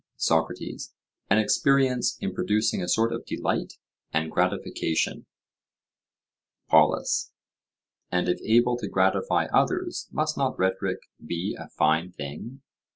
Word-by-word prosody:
SOCRATES: 80 0 -1 0.3
An 105 - +5
experience 130 +3 +2
in - - -3
producing 105 -1 +1
a 90 - -3
sort 115 +5 +2
of - - -4
delight - - -2 0.4
and 80 0 -1
gratification. 80 - -1 1.4
POLUS: - - +3 0.8
And 90 0 +1
if 90 - 0
able 120 +2 +3
to - - -5
gratify 475 - +2
others, 360 -1 +1
must 155 0 -1
not 135 -2 0
rhetoric 95 0 0 0.2
be 85 +5 -3
a - - -10
fine 80 +4 +1
thing? 90 - -8
110 Hz, 115 wpm, -26 LUFS, 85-130 Hz, 1.4 s, An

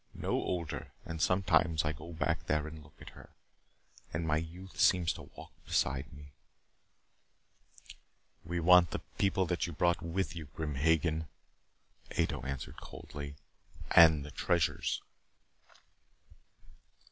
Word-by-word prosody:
No - - -3
older. 85 -4 -2
And 80 -1 -5
sometimes 85 -4 +3
I 75 - 0
go 85 +3 -10
there 75 -1 0
and 80 0 -8
look 70 0 -19
at - - -11
her, - - -14 0.8
and 80 +2 -2
my 75 -1 +2
youth 85 +4 -7
seems 90 -3 +4
to - - -11
walk - - -10
beside 65 0 0
me 70 0 -13 1.0
" - - -22
"We 85 +2 -3
want 90 0 +6
the - - -4 0.2
people 95 -1 +2
that 90 -1 -1
you 85 - -6
brought 85 +3 +2
with 85 +2 -2
you, 80 -2 -6
Grim 75 +1 -5
Hagen," 80 +2 +1 0.9
Ato - - 0
answered 70 0 -6
coldly. 70 -1 -8 0.6
"And 80 -4 +7
the 75 - -9
treasures." 85 -1 0
80 Hz, 130 wpm, -32 LUFS, 75-85 Hz, 1.0 s, And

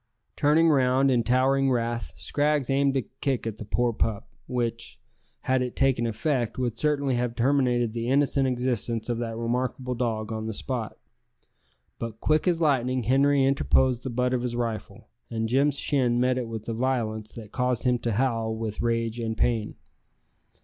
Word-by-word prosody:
'Turning 155 +3 +4
round 135 -1 +3
in 120 -2 +3
towering 135 +3 +2
wrath, 120 -2 -1
Scraggs 145 -2 0
aimed 135 0 +2
a 130 - 0
kick 135 0 -3
at 110 -2 -4
the - - -5
poor 120 +3 0
pup, 110 -1 -2 0.2
which, 120 -2 -3 0.4
had 130 0 +1
it 125 -1 -3
taken 130 -3 +2
effect, 120 +1 -1
would 120 -3 -2
certainly 145 -3 +1
have 120 -1 -1
terminated 120 -2 +2
the 115 0 -3
innocent 140 0 +2
existence 120 -2 -1
of 120 -1 -1
that 115 -1 -4
remarkable 125 +2 -2
dog 115 -3 -2
on 110 0 -4
the 110 - -3
spot; 125 -3 -3 1.0
but 115 -1 -6
quick 155 +6 +1
as 175 -2 +2
lightning 130 -5 +1
Henri 135 +4 +3
interposed 130 -2 +2
the 130 - -4
butt 125 +1 0
of 125 - 0
his 120 -1 -3
rifle, 115 -2 -4 0.2
and 115 -1 -2
Jim's 140 +4 +2
shin 125 -5 +2
met 125 +1 +2
it 125 -2 -3
with 110 -1 -7
a 115 - -2
violence 110 -3 -2
that 110 -3 -10
caused 125 -2 0
him 125 -1 +2
to 115 -2 -2
howl 115 -1 0
with 110 -2 -4
rage 115 0 -1
and 110 -1 -3
pain. 115 -3 0
125 Hz, 175 wpm, -26 LUFS, 115-135 Hz, 1.0 s, Turning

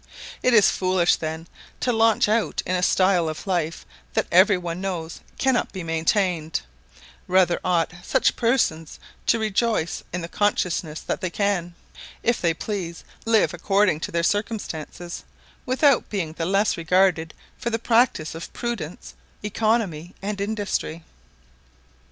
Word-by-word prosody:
It 250 -1 +4
is 210 - +6
foolish, 185 -2 +2
then, 160 +1 -5 0.3
to 245 - +1
launch 225 -1 +4
out 220 +1 0
in 185 - 0
a 180 - 0
style 185 -2 +3
of 155 - -6
life 170 -4 -1 0.3
that - - +2
every 190 +2 +6
one 175 0 -5
knows 175 -4 -4 0.2
cannot 265 -2 +1
be 185 -3 -6
maintained; 165 0 0 0.7
rather 180 -1 +3
ought 175 -2 +1
such 265 - +2
persons 225 - 0 0.3
to 230 - +4
rejoice 220 -4 0
in 180 - -3
the 165 - -5
consciousness 175 -5 -1
that - - -3
they 185 - -1
can, 175 -2 -1 0.5
if 235 +1 +1
they 170 - +3
please, 175 -4 -5 0.2
live 220 -4 +3
according 195 -1 +2
to - - -4
their 170 0 0
circumstances, 175 -5 -3 0.4
without 265 +1 +3
being 175 -7 -3
the 165 0 -3
less 195 +2 +2
regarded 170 -1 +2 0.2
for 235 - -2
the 225 - 0
practice 230 -8 +2
of 165 +1 -8
prudence, 230 -9 -5 0.3
economy, 210 -6 -1
and 200 0 -4
industry. 200 -6 -2
185 Hz, 140 wpm, -24 LUFS, 165-215 Hz, 0.7 s, is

